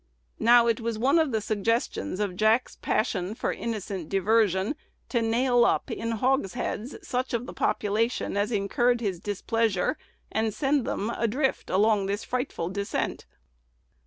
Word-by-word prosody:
Now, 235 +1 +6
it 230 -1 +1
was 230 -1 -2
one 270 +8 +3
of 315 -4 +2
the 220 -2 0
suggestions 210 - -1
of 200 -3 -1
Jack's 220 +5 +2
passion 210 -3 -1
for - - -1
innocent 200 -7 -4
diversion 200 - +2 0.3
to 235 - +1
nail 240 +2 +3
up - - +1
in 230 0 -2
hogsheads 250 0 -1
such 250 -1 -1
of 235 +1 -2
the - - -8
population 220 +3 0
as 205 +3 0
incurred 240 +4 +1
his 195 -6 -2
displeasure, 205 0 0 0.3
and 220 -1 0
send 275 +1 +1
them 215 +4 -2
adrift 255 +4 0
along 205 0 +3
this 200 +1 -2
frightful 245 -9 -3
descent. 200 +1 -3
225 Hz, 145 wpm, -27 LUFS, 200-240 Hz, 0.3 s, Now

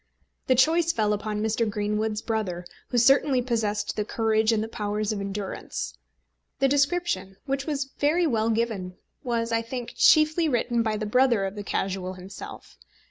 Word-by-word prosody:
The 255 - +4
choice 320 +6 +4
fell 215 -6 +1
upon 210 0 -3
Mr. 220 0 0
Greenwood's 210 +1 -1
brother, 195 -6 -2 0.2
who 245 - -2
certainly 270 +2 +4
possessed 225 -4 -1
the 210 - 0
courage 220 0 +1
and 220 -1 +1
the - - -4
powers 210 -1 -2
of 205 -2 -3
endurance. 195 - -5 0.6
The 270 - +3
description, 280 - 0
which 275 0 -2
was 275 -3 -2
very 320 +5 +3
well 225 -6 +1
given, 220 -5 -2 0.3
was, 235 -2 -1
I 230 0 +2
think, 240 +1 -6
chiefly 310 +1 +5
written 240 -2 +1
by 220 -2 0
the 215 - -3
brother 235 -2 +3
of 195 - -4
the 205 - -6
Casual 190 -2 -2
himself. 185 +2 -10
225 Hz, 165 wpm, -26 LUFS, 210-260 Hz, 0.6 s, chiefly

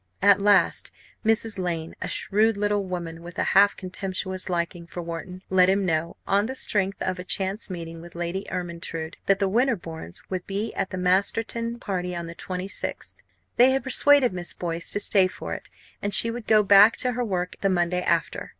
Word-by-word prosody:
At 200 0 +6
last 200 -3 +3 0.3
Mrs. 225 -2 +1
Lane, 165 -3 -3
a - - -3
shrewd 215 +1 +1
little 205 0 0
woman 170 -3 -6
with 175 +1 -11
a - - +1
half 200 +1 +5
contemptuous 185 0 -4
liking 170 -1 -3
for 175 +1 -7
Wharton, 180 +3 -7
let 185 -1 +5
him 195 0 +2
know 165 -1 -1
on 200 +2 +2
the 260 - -5
strength 195 -6 0
of 185 -1 -2
a - - -5
chance 195 +3 -1
meeting 165 -2 -7
with 170 0 -13
Lady 175 +3 -4
Ermyntrude 170 -2 -5
that 195 - +4
the 200 -1 +1
Winterbournes 190 - -2
would 185 -1 -5
be 205 +3 -3
at 195 - -2
the 185 - -5
Masterton 225 +6 0
party 180 -5 -3
on 170 0 -4
the 165 - -8
26th. 185 +2 -5 0.4
They 245 +2 +7
had 270 0 +1
persuaded 270 -3 +5
Miss 175 -1 -3
Boyce 170 -1 -3
to - - 0
stay 195 -2 +4
for 185 - -7
it, - - -8 0.3
and 205 0 +1
she 230 - +6
would 235 -1 -7
go 215 -1 +5
back 200 +2 +7
to 250 - +1
her 245 +1 -2
work 180 -5 -3
the 195 - +2
Monday 180 -1 +1
after. 170 -2 -1
190 Hz, 195 wpm, -25 LUFS, 175-205 Hz, 0.4 s, They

